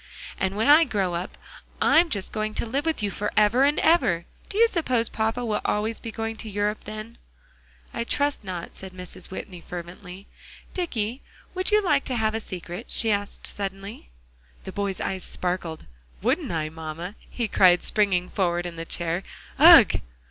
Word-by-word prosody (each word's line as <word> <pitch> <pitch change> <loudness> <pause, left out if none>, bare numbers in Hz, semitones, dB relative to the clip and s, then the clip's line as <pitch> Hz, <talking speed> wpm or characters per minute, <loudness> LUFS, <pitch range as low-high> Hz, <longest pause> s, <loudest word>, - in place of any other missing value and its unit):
"And 190 0 0
when 220 - +1
I 300 +3 +8
grow 200 - -1
up, 175 +3 -4 0.4
I'm 335 +1 +5
just 200 -9 -2
going 215 0 -3
to - - -1
live 275 +7 -2
with 320 -9 0
you 205 - 0
forever 210 +5 +2
and 290 +1 +2
ever. 200 - +3 0.2
Do 405 - -5
you 465 +1 +7
suppose 255 - 0
papa 225 +2 -1
will 215 -2 0
be - - -14
always 215 +2 0
going 225 -1 -4
to 220 - -7
Europe 205 +1 -1
then?" 215 +2 -8 0.7
"I 235 - -2
trust 285 +1 -1
not," 180 -3 -6
said 190 -1 -10
Mrs. 180 -1 -9
Whitney 185 -2 -7
fervently. 180 +3 -9 0.5
"Dicky, 250 - -2 0.3
would 370 0 0
you 425 0 +4
like 295 -6 +2
to 255 - -2
have 220 -2 +1
a 225 - -1
secret?" 180 +1 -7
she 225 - +2
asked 205 0 -2
suddenly. 195 - -6 0.5
The - - -7
boy's 200 -2 -2
eyes 190 -1 -3
sparkled. 175 -3 -2 0.4
"Wouldn't - - +1
I 155 -2 -1
mamma?" 160 +3 -6 0.2
he 235 -2 -2
cried, 180 -3 +5
springing 195 -4 +2
forward 175 -2 0
in 170 -1 -6
the 165 - -5
chair; 170 +1 -2 0.4
"ugh!" - - +9
210 Hz, 175 wpm, -25 LUFS, 180-235 Hz, 0.7 s, ugh